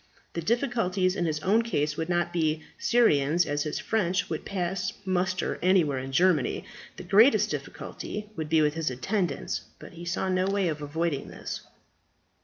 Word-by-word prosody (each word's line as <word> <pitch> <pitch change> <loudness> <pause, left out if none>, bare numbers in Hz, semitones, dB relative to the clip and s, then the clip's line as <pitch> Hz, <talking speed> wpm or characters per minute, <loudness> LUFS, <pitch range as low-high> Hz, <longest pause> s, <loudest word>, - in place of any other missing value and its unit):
The 170 - -2
difficulties 200 - +1
in 175 - 0
his 155 -1 -1
own 205 +7 +3
case 150 -10 -1
would 160 +2 -3
not 175 0 0
be 160 -2 0 0.2
serious, 170 - +3
as 145 0 -1
his 150 0 -2
French 185 -5 0
would 160 - -3
pass 190 0 -2
muster 185 0 0
anywhere 170 -7 +3
in 130 +1 -6
Germany. 165 -1 +2 0.3
The - - -7
greatest 210 +9 +5
difficulty 210 0 -6
would 155 -2 -4
be 160 -1 +4
with 150 0 +2
his 160 -2 -1
attendants; 160 - -2 0.2
but - - -12
he 170 +1 -9
saw 175 +2 -1
no 185 0 +1
way 195 -2 +1
of 150 -1 -4
avoiding 150 0 -2
this. - - -6
175 Hz, 170 wpm, -27 LUFS, 155-190 Hz, 0.3 s, greatest